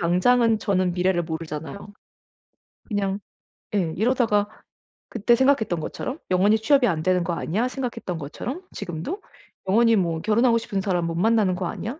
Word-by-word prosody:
당장은 225 +6 +3
저는 185 -3 +1
미래를 180 0 +1
모르잖아요. 160 +4 -6 1.0
그냥 200 -2 -1 0.6
예 170 -5 0
이러다가 220 -2 +2 0.6
그때 235 +1 +2
생각했던 235 -9 +2
것처럼 260 - -5
'영원히 200 +4 +4
취업이 265 +2 +3
안 160 -4 -1
되는 180 -1 +2
거 170 - -1
아니야.' 215 +10 -1
생각했던 235 -9 -4
것처럼 240 - -6
지금도 195 - -5 0.5
'영원히 230 +3 +4
뭐 165 -4 0
결혼하고 230 +2 +3
싶은 205 -3 -3
사람 180 -3 0
못 165 - -3
만나는 205 -1 +2
거 180 -1 -3
아니야.' 245 - -5
200 Hz, 360 characters per minute, -24 LUFS, 175-230 Hz, 1.0 s, 영원히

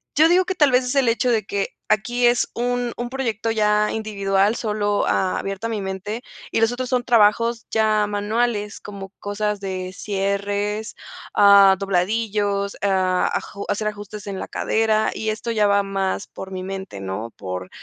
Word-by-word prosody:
yo 315 +2 +6
digo 360 +2 +4
que 375 - -2
tal 295 -4 +4
vez 250 +1 +4
es 250 +3 -2
el 270 -3 +3
hecho 235 +2 +2
de 220 -2 +1
que 200 -1 -2 0.2
aquí 240 +4 +1
es 240 0 +2
un 245 0 -1
un 240 0 -3
proyecto 230 -4 -2
ya 210 -1 +2
individual, 200 -1 +1
solo 210 -2 0
abierto 195 +3 -1
a - - -5
mi 215 -3 -2
mente 195 +4 -4 0.3
y - - +1
los 225 +1 +4
otros 250 0 -4
son 250 -2 +1
trabajos 230 0 +3
ya 215 -1 +2
manuales 210 +1 -1
como 195 -2 -8
cosas 205 0 -2
de 185 -1 -4
cierres, 205 +2 -2 0.4
ah, 200 -1 +7
dobladillos, 200 +1 0
ah, 185 -2 +2
aju 200 - -4
hacer 215 +1 -1
ajustes 205 0 -7
en 195 -1 -4
la - - -5
cadera, 220 -1 +1
y 220 0 -3
esto 220 +2 -3
ya 210 -2 +3
va 200 0 +3
más 195 0 -2
por 190 - -9
mi 185 -1 -5
mente, 190 - -6
¿no?, 95 +4 -5
por, 90 0 -5
210 Hz, 175 wpm, -22 LUFS, 195-230 Hz, 0.4 s, ah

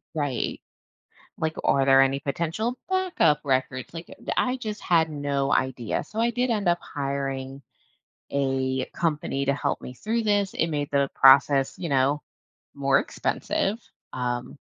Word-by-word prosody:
Right, 145 -5 -2 0.8
like, 160 0 -2
are 135 -1 +3
there 135 0 +7
any 135 +1 +2
potential 170 - -2
backup 370 - +2
records, 130 0 -1
like, 165 +1 -8 0.3
i 250 - +2
I 260 - -2
just 215 -4 -5
had 165 -3 +3
no 140 -2 -1
idea, 125 -3 -1
so 220 - -7
I 235 +1 +2
did 250 +2 0
end 210 -5 0
up 175 0 +3
hiring 135 -1 -4 0.7
a 130 -1 0
company 150 -4 -2
to 140 - +2
help 140 0 -2
me 125 - -8
through 225 - -1
this, 205 -2 +1
it - - +1
made 145 -2 -2
the 140 -1 +2
process, 135 0 +5
you 175 - -4
know, 140 +1 +2 0.5
more 140 -1 +3
expensive, 210 +4 -1 0.3
um 125 +1 -3
140 Hz, 150 wpm, -25 LUFS, 135-175 Hz, 0.8 s, there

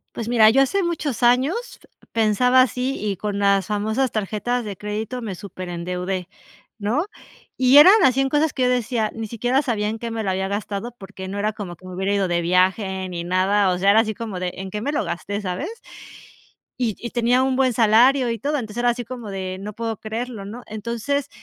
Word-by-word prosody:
Pues 230 - -4
mira, 225 -2 +6
yo 265 +5 +4
hace 395 +9 0
muchos 315 - -2
años 285 - +1 0.3
pensaba 230 +4 +4
así 255 +1 -2
y 205 -2 -2
con 205 +1 -3
las 200 -2 +2
famosas 220 +5 0
tarjetas 220 +3 -2
de 205 -2 -5
crédito 210 +5 -4
me 210 -5 -5
superendeudé, 180 0 -5 0.5
¿no? 230 - 0 0.5
Y 260 +2 +6
eran 360 +7 +10
así 265 -2 +4
en 270 - +1
cosas 300 +2 +2
que 260 - -1
yo 250 - +3
decía, 235 -3 0
ni 225 -1 -5
siquiera 245 +5 0
sabía 225 -7 -1
en 225 +1 -3
qué 235 - -4
me 225 -1 -3
lo 195 - 0
había 190 +1 -1
gastado 205 +3 -4
porque 190 -2 -9
no 195 +2 -5
era 215 +1 0
como 190 -5 -7
que 185 - -18
me 185 - -8
hubiera 190 +2 -1
ido 200 -2 +1
de 175 -1 0
viaje 185 +2 +1
ni 170 -1 -4
nada, 190 +3 +2
o 180 - 0
sea, 195 +2 +4
era 215 - +5
así 220 -1 0
como 220 -5 -5
de, 180 0 -2
¿en 190 0 -7
qué 210 - -4
me 280 - -1
lo 295 - 0
gasté?, 205 +4 -4
¿sabes? 195 - -3 1.1
Y 230 -5 -1
y 235 - -6
tenía 245 +2 +2
un 265 0 +1
buen 260 -2 +3
salario 240 +4 +4
y 230 - -3
todo, 290 +2 -1
entonces 220 -4 -6
era 245 0 +3
así 240 0 -2
como 240 -2 -7
de 190 -1 -4
no 210 +2 -6
puedo 225 0 -4
creerlo, 225 0 -5
¿no? 230 +5 -8
Entonces, 235 +6 -3
220 Hz, 215 wpm, -22 LUFS, 195-250 Hz, 1.1 s, eran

